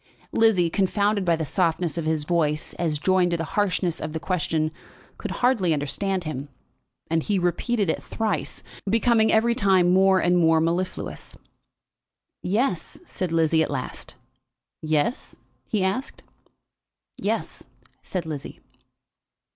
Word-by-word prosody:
Lizzie, 220 -6 +4
confounded 200 +2 +1
by 170 -2 +3
the 160 -1 -3
softness 170 0 0
of 165 -2 -3
his 155 -1 0
voice 155 -2 0
as 160 -3 0
joined 185 +3 +2
to 170 - 0
the 165 - -2
harshness 185 -4 0
of 155 0 -4
the 160 - -2
question, 160 -3 -1 0.5
could - - -4
hardly 230 -10 +2
understand 185 +6 -1
him, 145 -3 -5 0.6
and 165 0 +2
he 205 +4 0
repeated 190 +5 0
it 160 - -1
thrice, 220 -2 -3 0.3
becoming 225 0 +3
every 235 +2 +3
time 190 -5 +3
more 190 0 +5
and 175 0 +3
more 165 -1 +4
mellifluous. 170 +3 -3 1.0
"Yes," 195 - -1
said 185 - -4
Lizzie 160 -1 +3
at - - 0
last. - - -5 0.7
"Yes?" 155 - -1 0.3
he 210 -5 0
asked. 195 +8 -2 1.0
"Yes," - - -2 0.4
said 180 -3 -4
Lizzie. 150 -3 -6
180 Hz, 130 wpm, -24 LUFS, 160-200 Hz, 1.0 s, more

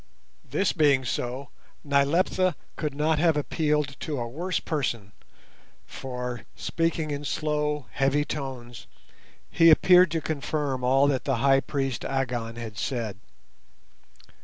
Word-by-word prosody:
This 195 - 0
being 140 -5 +3
so, 125 +3 -3 0.3
Nyleptha 155 +5 +2 0.2
could 150 -3 -3
not 155 +1 +1
have 165 -2 +3
appealed 150 -1 0
to 150 -2 -3
a 120 - -3
worse 170 +9 -2
person, 120 -9 -3 0.7
for, 125 -3 -6
speaking 165 -2 -1
in 145 0 -3
slow, 150 -1 -1
heavy 140 +2 +1
tones, 130 -6 -6 0.6
he 165 0 +6
appeared 180 +3 +6
to 165 +1 -1
confirm 145 -4 -2
all 135 +2 +4
that 135 -3 -1
the 135 - +1
High 135 +3 +4
Priest 135 -4 -2
Agon 120 -4 -2
had 110 -3 -7
said. 110 -7 -3
140 Hz, 125 wpm, -26 LUFS, 125-155 Hz, 0.7 s, he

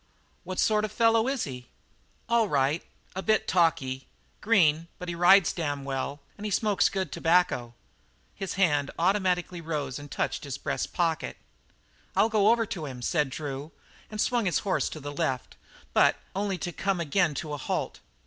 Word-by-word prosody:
What 185 0 -6
sort 215 -1 +3
of 215 - -1
a - - -15
fellow 230 0 +4
is 270 -2 0
he?" 125 -3 -7 0.6
"All 230 -2 +3
right. 145 +2 +1 0.3
A 190 - -2
bit 215 +2 +2
talky. 135 -7 +1 0.3
Green; 170 -7 +3
but 180 - -6
he - - -2
rides 175 +2 +6
damn 145 -4 -2
well, 140 +1 -3 0.2
an' - - -8
he 215 - -2
smokes 205 0 +2
good 190 -2 -3
tobacco." 165 -9 +2 0.6
His 195 -1 -4
hand 150 -7 +2
automatically 180 -1 +1
rose 150 -5 -3
and 145 0 -10
touched - - -2
his 140 -2 -5
breast - - -3
pocket. 165 -2 -1 0.8
"I'll 225 - +4
go 215 -1 +4
over 230 0 +3
to 165 -7 -5
him," 125 -2 -7
said 150 +1 +1
Drew, 140 +2 -5 0.4
and 215 - -7
swung 240 0 +1
his 180 - +2
horse 190 - +1
to 155 - -7
the 145 0 -6
left, 140 -5 -2 0.4
but - - +5 0.2
only 200 -1 -1
to 175 +1 -4
come 190 +1 -1
again 170 0 +1
to 150 +1 -4
a - - -2
halt. 135 - -3
170 Hz, 175 wpm, -28 LUFS, 145-200 Hz, 0.8 s, rides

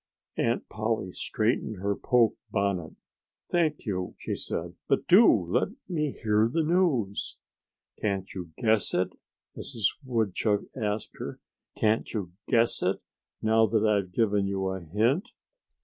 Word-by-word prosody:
Aunt - - 0
Polly 110 -4 -2
straightened 110 +3 -1
her 100 +2 -1
poke 120 -1 +3
bonnet. 95 -5 -1 0.6
"Thank 160 -5 +1
you!" 90 -4 -3
she - - -4
said. 85 +1 -4
"But 135 - +1
do 210 +6 +8
let 90 -4 +1 0.2
me 155 -5 0
hear 110 -3 +1
the 165 +3 +1
news." 150 - +1 0.6
"Can't 100 -2 -2
you 90 -3 -6
guess 110 -2 +3
it?" 90 0 +1 0.4
Mrs. 115 -6 -7 0.2
Woodchuck 110 -4 +1
asked 105 -3 -3
her. - - -6 0.4
"Can't 110 +1 +1
you 95 -5 -3 0.2
guess 115 -2 +3
it, - - +1 0.4
now 110 0 +4
that 110 0 +2
I've 100 -4 +2
given 100 0 +2
you 95 -1 -1
a 95 0 -3
hint?" 115 - 0
110 Hz, 135 wpm, -28 LUFS, 100-120 Hz, 0.6 s, do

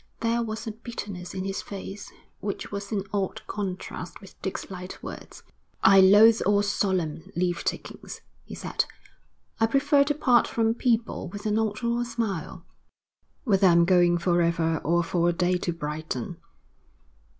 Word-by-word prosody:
There 230 +1 +1
was 220 0 -4
a 220 - -3
bitterness 205 -5 -7
in 190 0 -3
his 195 0 -3
face 200 0 -8 0.3
which 200 -1 -5
was 200 +1 -5
in 200 -3 -1
odd 195 -2 -2
contrast 185 -3 -5
with 195 -1 -16
Dick's 190 0 -5
light 180 0 -8
words. - - -9 0.4
'I 195 0 +8
loathe 210 +4 +7
all 205 0 +3
solemn 185 -6 -1
leave 175 0 0
takings,' - - -5 0.2
he - - -9
said. - - -1 0.7
'I 225 - +4
prefer 280 +3 +4
to 295 0 0
part 250 -5 +4
from 225 -1 +1
people 230 -4 0
with 205 +4 -8
a 215 - +1
nod 215 +1 0
or 235 0 +1
a - - -1
smile, 225 -8 -4 0.8
whether 195 -5 +4
I'm 170 -1 +5
going 175 -1 +4
for 175 0 +2
ever 165 -1 +1
or 170 +3 +1
for 170 +1 +1
a - - +1
day 180 +1 +1
to 175 - -1
Brighton.' 155 -2 -5
195 Hz, 160 wpm, -26 LUFS, 175-225 Hz, 0.8 s, I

